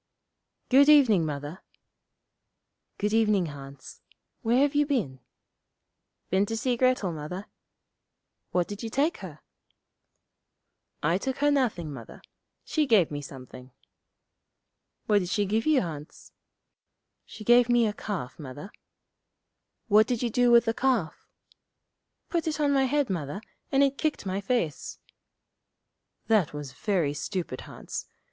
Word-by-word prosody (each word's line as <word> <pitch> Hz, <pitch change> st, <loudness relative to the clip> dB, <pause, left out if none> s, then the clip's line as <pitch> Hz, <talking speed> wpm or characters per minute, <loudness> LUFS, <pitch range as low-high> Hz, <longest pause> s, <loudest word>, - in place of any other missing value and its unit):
'Good 280 Hz, +3 st, +6 dB
evening, 230 Hz, -, +5 dB
Mother.' 145 Hz, +4 st, -6 dB, 1.4 s
'Good 210 Hz, +1 st, -1 dB
evening, 215 Hz, -4 st, +3 dB
Hans. 135 Hz, -1 st, -11 dB, 0.4 s
Where 235 Hz, +1 st, +2 dB
have 285 Hz, 0 st, +2 dB
you 295 Hz, 0 st, +3 dB
been?' 205 Hz, -, -1 dB, 1.1 s
'Been 195 Hz, +2 st, +2 dB
to 225 Hz, -, -3 dB
see 245 Hz, +2 st, 0 dB
Grettel, 255 Hz, -6 st, +1 dB
Mother.' 160 Hz, +6 st, -6 dB, 1.0 s
'What 180 Hz, -1 st, 0 dB
did 205 Hz, 0 st, -7 dB
you 230 Hz, -, -4 dB
take 285 Hz, +8 st, 0 dB
her?' 160 Hz, -6 st, -10 dB, 1.6 s
'I 165 Hz, +5 st, +2 dB
took 265 Hz, +4 st, -3 dB
her 290 Hz, +1 st, +2 dB
nothing, 215 Hz, -, 0 dB
Mother. 120 Hz, -4 st, -11 dB, 0.4 s
She 305 Hz, -2 st, 0 dB
gave 205 Hz, -, +4 dB
me 145 Hz, 0 st, -4 dB
something.' 130 Hz, -2 st, -11 dB, 1.4 s
'What 210 Hz, -3 st, +3 dB
did 180 Hz, -2 st, -4 dB
she 205 Hz, +2 st, +1 dB
give 220 Hz, +7 st, -1 dB
you, 305 Hz, -4 st, +4 dB
Hans?' 150 Hz, -4 st, -8 dB, 1.0 s
'She 215 Hz, -, -10 dB
gave 240 Hz, +2 st, +5 dB
me 240 Hz, -1 st, +4 dB
a 210 Hz, -, -1 dB
calf, 195 Hz, -12 st, -5 dB
Mother.' 145 Hz, +6 st, -9 dB, 1.2 s
'What 215 Hz, 0 st, +5 dB
did 245 Hz, -1 st, -1 dB
you 235 Hz, -, -1 dB
do 245 Hz, +2 st, +3 dB
with 235 Hz, -1 st, +6 dB
the 225 Hz, -, +1 dB
calf?' 245 Hz, -10 st, -1 dB, 1.0 s
'Put 335 Hz, -2 st, -2 dB
it 310 Hz, -1 st, -2 dB
on 290 Hz, -1 st, +2 dB
my 270 Hz, -1 st, +3 dB
head, 280 Hz, -3 st, 0 dB
Mother, 160 Hz, 0 st, -3 dB, 0.3 s
and 275 Hz, +1 st, +4 dB
it 275 Hz, 0 st, 0 dB
kicked 310 Hz, -8 st, -1 dB
my 190 Hz, +1 st, -2 dB
face.' 195 Hz, -, -2 dB, 1.3 s
'That 210 Hz, -9 st, +2 dB
was 145 Hz, -3 st, -6 dB
very 165 Hz, 0 st, 0 dB
stupid, 165 Hz, -3 st, -4 dB
Hans. -, -, -7 dB
210 Hz, 135 wpm, -27 LUFS, 160-250 Hz, 1.6 s, Good